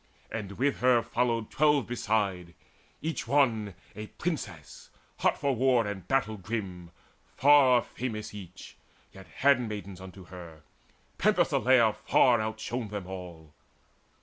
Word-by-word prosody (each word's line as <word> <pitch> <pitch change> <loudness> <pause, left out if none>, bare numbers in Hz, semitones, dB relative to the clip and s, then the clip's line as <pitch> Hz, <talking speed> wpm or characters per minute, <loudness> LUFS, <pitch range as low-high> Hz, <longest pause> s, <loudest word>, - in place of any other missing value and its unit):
And 100 -3 -5
with 135 +7 0
her 125 -2 +4
followed 115 -2 -1
twelve 150 -3 +3
beside, 100 -7 -2 0.5
each 160 -7 -3
one 115 -8 +1 0.2
A 105 +1 -7
princess, 100 - -6 0.3
hot - - +2
for 140 -2 0
war 125 -1 +3
and 95 -3 -6
battle 120 -5 0
grim, 95 -4 -5 0.5
Far 135 -3 +6
famous 110 -4 -6
each, 95 -3 -11 0.4
yet 95 -1 -13
handmaids 105 -9 0
unto 95 0 -11
her: 85 -4 -12 0.6
Penthesileia 120 -4 +3
far 120 -3 +3
outshone 110 +2 -4
them 105 -2 -6
all. 90 -5 -9
110 Hz, 120 wpm, -28 LUFS, 95-125 Hz, 0.6 s, Far